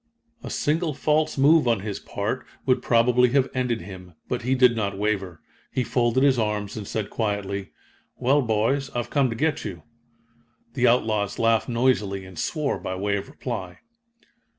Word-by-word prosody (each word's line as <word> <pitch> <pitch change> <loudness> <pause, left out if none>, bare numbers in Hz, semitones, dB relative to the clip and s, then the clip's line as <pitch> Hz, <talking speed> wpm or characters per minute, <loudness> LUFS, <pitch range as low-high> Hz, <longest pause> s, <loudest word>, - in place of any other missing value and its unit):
A - - -7
single 155 0 0
false 155 +1 +1
move 145 +1 +5
on 115 -4 +2
his 100 -1 -4
part - - -3 0.2
would 130 - +2
probably 125 +1 +4
have 135 -2 +2
ended 125 -3 -1
him, 90 -2 -11
but 125 - -2
he 130 +3 +1
did 125 -2 +5
not 100 -3 -2
waver. 95 -5 -2 0.3
He 130 - 0
folded 120 +2 +1
his 135 -3 +4
arms 105 -2 -2
and 105 -3 -6
said 110 -2 -3
quietly: 100 -3 -2 0.5
"Well, 140 +4 +3
boys, 120 +4 0
I've 120 -1 -3
come 140 -3 +2
to 115 - -3
get 155 +5 0
you." 90 -7 -7 0.9
The 125 -1 +2
outlaws 110 -4 +1
laughed 115 -1 +2
noisily 115 -6 +1
and 95 -3 -10
swore 150 -4 -1
by 95 - -4
way 100 +2 -1
of 100 - -4
reply. 115 -10 -6
115 Hz, 170 wpm, -24 LUFS, 100-130 Hz, 0.9 s, move